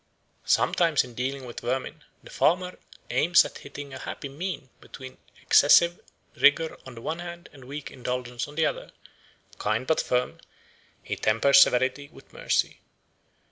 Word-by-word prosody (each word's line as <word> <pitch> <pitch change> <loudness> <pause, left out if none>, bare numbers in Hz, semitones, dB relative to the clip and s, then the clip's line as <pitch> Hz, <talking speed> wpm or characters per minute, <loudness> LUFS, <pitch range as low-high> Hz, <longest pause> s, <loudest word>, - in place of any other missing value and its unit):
Sometimes 165 -4 +3
in 125 -1 -12
dealing 130 +2 -4
with 120 - -8
vermin 135 +5 -4 0.2
the - - -14
farmer 180 +2 +1 0.3
aims 170 +2 +4
at - - -9
hitting 140 0 -9
a 130 - -7
happy 140 - -7
mean 145 -3 -6
between 130 -1 -12 0.2
excessive 170 +1 +5 0.4
rigour 155 +3 +3
on 130 - -10
the 115 - -10
one 160 +6 -4
hand 175 0 -9
and 135 -3 -14
weak 145 +2 -7
indulgence 125 -1 -4
on 145 - -13
the 160 0 +2
other; - - -3 0.7
kind 110 +4 -1
but 160 - +1
firm, 125 0 -1 0.6
he - - -4
tempers 140 +6 +4
severity 130 +3 +2
with - - -18
mercy. - - -1
140 Hz, 150 wpm, -26 LUFS, 125-160 Hz, 0.7 s, excessive